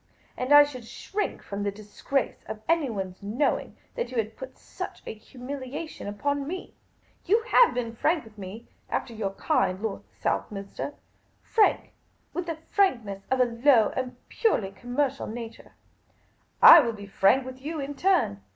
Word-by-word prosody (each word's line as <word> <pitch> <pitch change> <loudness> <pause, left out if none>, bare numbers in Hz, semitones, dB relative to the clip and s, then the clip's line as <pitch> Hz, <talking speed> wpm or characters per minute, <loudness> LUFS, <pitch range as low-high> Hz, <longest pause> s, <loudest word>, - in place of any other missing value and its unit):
And 255 +2 -3
I 290 0 +10
should 255 -5 -7
shrink 415 - -4
from 200 0 -5
the 205 - 0
disgrace 215 +6 -3
of 215 0 -7
anyone's 225 - -1
knowing 225 +9 -1 0.2
that 480 - -3
you 255 - -6
had 220 0 -1
put 260 0 -9
such - - -8
a - - -5
humiliation 260 +6 -7
upon 280 +7 -2
me. 365 +3 -6 0.5
You 440 +5 +3
have - - +5
been 235 -2 -3
frank 315 +6 +1
with 220 -2 -16
me 205 +3 -9
— - - -38
after 235 - -2
your 205 -3 -3
kind, 255 - +1
Lord 215 -1 -3 0.2
Southminster; 200 +7 -3 0.5
frank 435 -2 +2 0.4
with 355 -1 -3
the 330 -2 -3 0.2
franknCvSS 235 - +2
of 260 -1 +2
a - - +6
low 235 -1 +4
and 255 -1 -3
purely 220 - +1
connnercial 255 +4 -2
nature. 230 0 -9 0.9
I - - +12
will 230 -1 +1
be 205 -2 -9
frank 200 +6 +3
with 260 0 -9
you 310 +3 -4
in 280 +1 -4
turn. 335 - +1
250 Hz, 160 wpm, -27 LUFS, 215-290 Hz, 0.9 s, I